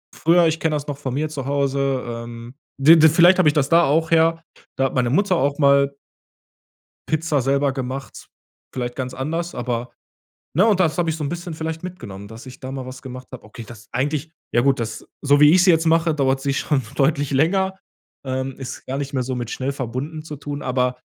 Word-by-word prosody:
früher, 170 Hz, +1 st, +4 dB
ich 160 Hz, 0 st, -1 dB
kenn 160 Hz, -, +1 dB
das 150 Hz, -1 st, -3 dB
noch 145 Hz, -2 st, -4 dB
von 135 Hz, -3 st, -4 dB
mir 155 Hz, +3 st, -1 dB
zu 145 Hz, -4 st, -5 dB
Hause, 140 Hz, -1 st, 0 dB
ähm 115 Hz, +1 st, -8 dB, 0.2 s
w 160 Hz, +4 st, +7 dB
w 160 Hz, -, +8 dB
vielleicht 175 Hz, +4 st, +6 dB
hab -, -, +3 dB
ich 150 Hz, -, +5 dB
das 145 Hz, -3 st, +1 dB
da 170 Hz, +1 st, +5 dB
auch 160 Hz, +2 st, +2 dB
her, 165 Hz, 0 st, +3 dB, 0.3 s
da 135 Hz, -, +2 dB
hat 135 Hz, -, -2 dB
meine 125 Hz, -2 st, +1 dB
Mutter 190 Hz, +5 st, +2 dB
auch 140 Hz, -1 st, 0 dB
mal 140 Hz, -1 st, +4 dB, 1.2 s
Pizza 155 Hz, -2 st, +1 dB
selber 140 Hz, +2 st, +1 dB
gemacht, 130 Hz, -1 st, -6 dB, 0.5 s
vielleicht 120 Hz, -1 st, -4 dB
ganz 130 Hz, -1 st, -4 dB
anders, 165 Hz, +6 st, -3 dB
aber 120 Hz, 0 st, -3 dB, 0.6 s
ne? 185 Hz, +6 st, +5 dB
Und 210 Hz, -4 st, +3 dB
das 170 Hz, -2 st, +2 dB
hab 175 Hz, -1 st, +1 dB
ich 160 Hz, -, 0 dB
so 160 Hz, -, -5 dB
'n 140 Hz, -, -2 dB
bisschen 175 Hz, 0 st, -5 dB
vielleicht 160 Hz, +1 st, -5 dB
mitgenommen, 115 Hz, -, -8 dB
dass 115 Hz, +4 st, -11 dB
ich 130 Hz, -, -11 dB
da 130 Hz, 0 st, -7 dB
mal 135 Hz, -1 st, -6 dB
was 130 Hz, 0 st, -10 dB
gemacht 130 Hz, 0 st, -9 dB
hab. 130 Hz, -, -9 dB
Okay, 115 Hz, +2 st, -10 dB
das 110 Hz, -2 st, -13 dB
eigentlich 145 Hz, +5 st, -2 dB, 0.2 s
ja 120 Hz, -, +3 dB
gut, 135 Hz, 0 st, +2 dB
das, 110 Hz, -2 st, -5 dB, 0.2 s
so 145 Hz, 0 st, +4 dB
wie 150 Hz, 0 st, +7 dB
ich 180 Hz, +1 st, +5 dB
sie 190 Hz, -, +4 dB
jetzt 165 Hz, -1 st, +4 dB
mache, 165 Hz, 0 st, +3 dB
dauert's 135 Hz, -2 st, +1 dB
sich 140 Hz, 0 st, -1 dB
schon 145 Hz, -3 st, 0 dB
deutlich 145 Hz, 0 st, +1 dB
länger. 190 Hz, +7 st, +1 dB, 0.5 s
Ähm, 130 Hz, 0 st, -3 dB
ist 135 Hz, -2 st, -7 dB
gar 135 Hz, -, -3 dB
nicht 140 Hz, 0 st, -4 dB
mehr 130 Hz, -, 0 dB
so 130 Hz, +1 st, -3 dB
mit 120 Hz, -1 st, -4 dB
schnell 135 Hz, +1 st, -2 dB
verbunden 140 Hz, +4 st, -5 dB
zu 150 Hz, -2 st, -8 dB
tun, 145 Hz, 0 st, -6 dB
aber 125 Hz, 0 st, 0 dB
140 Hz, 220 wpm, -21 LUFS, 130-160 Hz, 1.2 s, w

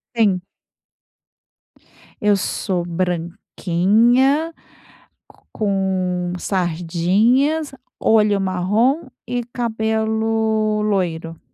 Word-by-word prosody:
Sim. 200 Hz, -6 st, +2 dB, 1.8 s
Eu 205 Hz, -1 st, +4 dB
sou 185 Hz, -2 st, -2 dB
branquinha, 195 Hz, -, +1 dB, 0.7 s
co -, -, -24 dB
com 185 Hz, -3 st, -1 dB
sardinhas, 195 Hz, -, +1 dB, 0.3 s
olho 210 Hz, -2 st, +3 dB
marrom 210 Hz, -, 0 dB, 0.2 s
e 245 Hz, 0 st, -2 dB
cabelo 220 Hz, -2 st, 0 dB
loiro. 170 Hz, -6 st, -2 dB
210 Hz, 60 wpm, -20 LUFS, 180-225 Hz, 1.8 s, Eu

